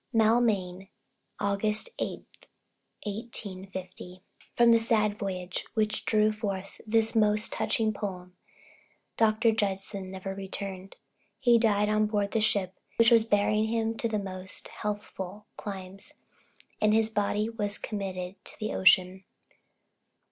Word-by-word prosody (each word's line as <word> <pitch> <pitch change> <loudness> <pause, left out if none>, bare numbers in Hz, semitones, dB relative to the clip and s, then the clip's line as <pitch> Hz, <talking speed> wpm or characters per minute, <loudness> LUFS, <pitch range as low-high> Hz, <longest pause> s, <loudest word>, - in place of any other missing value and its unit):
Maulmain, 215 -5 +2 0.5
August 210 - -1
8th, - - -3 0.8
1850 190 -4 -6 0.3
From 235 0 +6
the 230 - +6
sad 215 -2 +2
voyage 180 -2 -3
which 215 -1 0
drew 215 0 +3
forth 200 -3 -5
this 225 +1 +2
most 210 0 +3
touching 220 -1 0
poem 180 -3 -6 0.8
Dr. 225 +1 +3
Judson 195 -2 -2
never 190 0 -5
returned. 195 -1 -6 0.4
He 240 -2 +5
died 210 -2 +3
on 215 0 +2
board 205 -2 0
the 225 - +1
ship 195 -3 +1 0.2
which 230 +1 +5
was 230 -2 +6
bearing 210 0 +2
him 225 0 0
to 225 -2 0
more 190 -2 -6 0.3
healthful 205 -1 -5
climes; 195 -1 -7 0.7
and 215 0 +4
his 225 0 +2
body 210 0 0
was 210 -3 -2
committed 190 -3 -5
to - - -6
the 215 - -2
ocean. 185 0 +4
210 Hz, 120 wpm, -28 LUFS, 190-220 Hz, 0.8 s, From